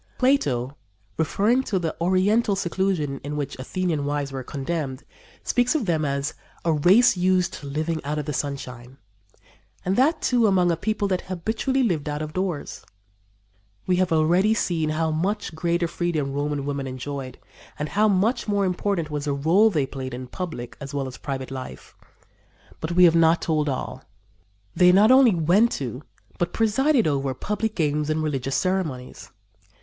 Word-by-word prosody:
Plato, 140 - +1 0.4
referring 205 - +2
to 195 - 0
the 165 -3 -2
oriental 200 +5 +2
seclusion 175 -6 -1
to 145 - -8
which 145 -2 -3
Athenian 165 +2 -2
wives 145 -1 -2
were 135 -1 -4
condemned, 140 0 -4 0.4
speaks 245 +3 +1
of 285 -8 0
them 160 -4 0
as 140 +1 -2 0.3
"a 165 - +3
race 200 +10 +5
used 180 0 +1
to 145 - -8
living 155 +3 -2
out 150 +2 -3
of 150 - -3
the 150 - -3
sunshine," 130 -2 -5 0.9
and 185 +2 +1
that, 305 +5 +3
too, 240 -3 +2
among 180 -3 +3
a - - +1
people 210 +4 -1
that 185 -1 0
habitually 220 +9 -1
lived 165 -10 0
out 150 +1 -3
of 155 0 -7
doors. 185 -5 -3 1.0
We 180 -1 +2
have 185 -1 +1
already 175 +7 +3
seen 165 -7 0
how 160 +1 0
much 180 +5 -2
greater 170 +1 0
freedom 165 -5 -2
Roman 145 0 -2
women 140 -1 -3
enjoyed 130 0 -6 0.4
and 150 0 -3
how 215 +2 +3
much 210 +5 +1
more 200 -1 +1
important 180 -3 -1
was 150 -1 -3
the 145 -1 0
rôle 175 +10 +4
they 150 -7 +1
played 130 -2 -6
in 130 +1 -6
public 155 -4 -6
as 140 +1 -7
well 135 -1 -1
as 130 - -8
private 135 -2 -5
life; 130 - -8 0.8
but 160 +2 -3
we 180 +1 +5
have 170 -2 +7
not 165 0 +4
told 155 -2 0
all. 130 - -4 0.7
They 180 0 +6
not 205 +6 +6
only 260 -6 +6
went 180 +8 +3
to, 125 -1 -4 0.4
but 175 0 -1
presided 240 +4 +2
over, 135 -3 0
public 210 - -2
games 150 -2 0
and 155 0 0
religious 135 -3 -2
ceremonies. 180 -10 -2
165 Hz, 170 wpm, -24 LUFS, 145-190 Hz, 1.0 s, have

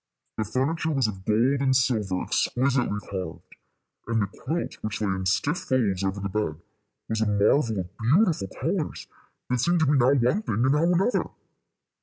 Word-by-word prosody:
The 110 - 0
furniture 140 +9 -1
was 135 -5 +1
of 95 -3 -4
gold 125 +6 +2
and 130 -1 +2
silver, 105 -8 +1
exquisitely 125 -5 0
carved, 95 -4 -7 0.5
and 115 -2 +1
the - - +1
quilt, 160 - -4
which 110 -1 -4
lay 105 -2 -1
in 95 -1 -2
stiff 140 - +1
folds 105 -8 0
over 95 +1 -1
the 100 - -3
bed, 95 -6 -2 0.5
was 110 0 -2
a 110 - +2
marvel 105 +2 +2
of 90 +2 -11
beautiful 150 - +2
colors - - -2 0.5
that 125 - +1
seemed 170 +6 +2
to - - +4
be 140 - +2
now 130 -4 +4
one 130 - +2
thing 115 - 0
and 135 - +3
now 160 +4 +3
another. 190 +7 +1
115 Hz, 180 wpm, -26 LUFS, 100-140 Hz, 0.5 s, to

